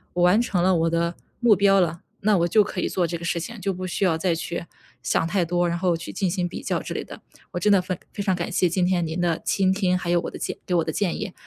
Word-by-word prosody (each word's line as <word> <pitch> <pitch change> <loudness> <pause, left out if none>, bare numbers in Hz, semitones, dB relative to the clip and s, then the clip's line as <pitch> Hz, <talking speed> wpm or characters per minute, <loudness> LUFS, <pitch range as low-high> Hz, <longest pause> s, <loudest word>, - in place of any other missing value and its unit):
我 175 - +2
完 180 +6 +5
成 195 -7 0
了 185 0 +3
我 165 0 +2
的 170 +1 0 0.2
目 235 -3 +5
标 195 0 +4
了， 170 -2 0 0.2
那 205 -1 +3
我 170 - +3
就 215 +4 +5
可 185 -2 -2
以 - - -1
做 180 -2 0
这 170 +1 -3
个 170 - -11
事 170 0 -1
情， 215 +4 -7
就 195 - -1
不 185 0 -5
需 180 - -2
要 170 -4 +3
再 170 0 +1
去 170 +1 -4 0.4
想 115 +7 +1
太 175 +1 +1
多， 175 +1 +1
然 170 0 -2
后 180 -2 +2
去 165 +1 -7
进 195 -3 -1
行 180 0 -1
比 - - -7
较 - - -1
之 - - -5
类 - - -4
的， - - -11 0.3
我 - - -3
真 210 - +3
的 195 -2 +5
非 185 -1 -4
非 205 - -5
常 195 -2 +1
感 170 -1 -4
谢 180 - +2
今 175 +1 +1
天 180 -2 +1
您 165 +3 -3
的 170 -2 0
倾 190 -1 +2
听， 190 -2 +1
还 175 - -4
有 175 0 +3
我 - - -4
的 - - -8
建 - - -4
给 180 - 0
我 170 - +3
的 160 - -2
建 180 +1 -1
议， 205 -4 -5
180 Hz, 325 characters per minute, -24 LUFS, 170-190 Hz, 0.4 s, 完